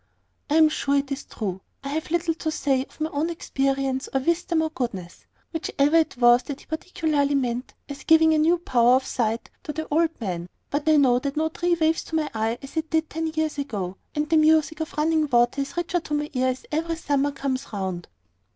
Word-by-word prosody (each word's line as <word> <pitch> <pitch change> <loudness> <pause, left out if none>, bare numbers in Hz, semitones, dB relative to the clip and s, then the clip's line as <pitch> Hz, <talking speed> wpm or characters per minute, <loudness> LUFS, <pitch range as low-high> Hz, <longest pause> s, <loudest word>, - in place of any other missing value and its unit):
"I 295 - +2
am 320 -1 +7
sure 280 -2 0
it 280 0 0
is 275 +1 -4
true. 190 -4 -5 0.2
I 275 - -4
have 310 +2 -3
little 340 0 +1
to 320 0 -3
say 275 -4 +1
of - - -23
my 315 +1 -1
own 300 +4 -1
experience, 270 -4 -1
or 270 - +1
wisdom, 335 +1 +1
or 315 - -2
goodness, 195 - -5 0.3
whichever 300 -1 +1
it 320 -6 +1
was 240 0 +6
that 285 0 -7
he - - -18
particularly 310 -3 0
meant 250 -2 -2
as 285 -1 -8
giving 320 0 +5
a 310 - +3
new 330 +3 +4
power 245 -7 +4
of 260 0 +1
sight 230 -1 -2
to 300 - -5
the 315 +1 -5
old 325 +2 +1
man; 180 -5 -4 0.2
but 290 +2 0
I 310 - +6
know 255 -4 +4
that 280 +2 -4
no 315 +1 +1
tree 345 +2 0
waves 320 +1 +2
to 320 - -5
my 310 -2 0
eye 225 +1 -1
as 275 +4 -9
it 320 0 -1
did 320 -1 0
ten 325 +1 -2
years 315 -2 -2
ago, 200 -10 -3 0.2
and 300 0 0
the 320 +1 +3
music 315 0 +3
of 320 - -3
running 310 0 +2
water 240 +2 +3
is 280 +3 -6
richer 345 0 0
to 305 -2 -4
my 295 0 -2
ear 255 -1 +1
as 255 0 -2
every 330 +2 -1
summer 285 -3 0
comes 270 -1 -3
round." 190 -4 -4
290 Hz, 225 wpm, -24 LUFS, 260-320 Hz, 0.3 s, am